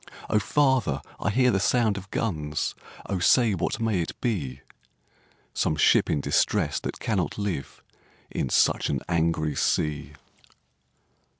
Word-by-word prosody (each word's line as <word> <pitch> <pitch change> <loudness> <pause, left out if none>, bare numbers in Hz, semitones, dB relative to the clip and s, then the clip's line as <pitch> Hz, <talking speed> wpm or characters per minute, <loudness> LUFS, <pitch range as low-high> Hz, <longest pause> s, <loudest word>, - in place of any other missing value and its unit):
'O 105 - +4
father! 130 - +1 0.2
I - - 0
hear 125 +4 +3
the 95 - +1
sound 110 +1 +2
of 100 0 -8
guns, 75 -10 -2 0.3
O 95 - -2
say, 115 +4 +4
what 95 +4 -2
may 110 -5 0
it 80 - -6
be?' 70 - -2 0.9
'Some 75 - 0
ship 75 - +4
in 75 - +1
distress - - +1
that - - -6
cannot 100 -6 -1
live 95 -10 -4 0.5
In 65 - -2
such - - +2
an - - -1
angry 80 -3 0
sea!' 75 -1 -1
95 Hz, 135 wpm, -26 LUFS, 75-110 Hz, 0.9 s, O